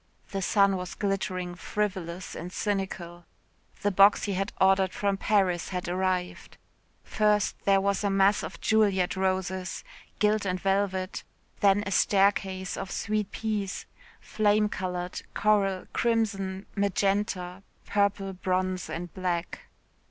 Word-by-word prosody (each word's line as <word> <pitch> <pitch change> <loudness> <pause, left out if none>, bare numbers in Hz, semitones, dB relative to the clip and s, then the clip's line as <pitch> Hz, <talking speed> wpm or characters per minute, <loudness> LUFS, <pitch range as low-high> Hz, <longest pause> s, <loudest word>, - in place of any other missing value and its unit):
The 195 -1 -2
sun 200 +1 +3
was 180 -1 -6
glittering 185 -3 -2
frivolous 185 -2 -3
and 180 - -6
cynical. 185 -4 -3 0.6
The 205 - +2
box 195 +2 +6
he 205 - -1
had 195 +2 -2
ordered 190 -1 +4
from 200 -1 0
Paris 190 -4 +1
had 180 -2 -4
arrived. 185 0 -2 0.5
First 210 -1 +1
there 195 -1 +5
was 200 +1 0
a 200 - +2
mass 195 +1 +3
of - - -7
Juliette 200 -5 +2
roses 190 0 -2 0.3
gilt 210 0 +2
and 185 -2 -1
velvet 195 -1 -1 0.4
then 200 0 +4
a 200 - -3
staircase 195 -1 +2
of 195 - -5
sweet 210 0 -1
peas, 210 -3 -3 0.3
flame 210 0 +2
coloured, 180 -2 -4
coral, 200 -3 +2
crimson, 200 -5 0
magenta, 195 -2 0 0.2
purple, 200 -1 0
bronze 185 0 -1
and 175 0 -5
black. 180 -2 -3
195 Hz, 125 wpm, -28 LUFS, 185-205 Hz, 0.6 s, box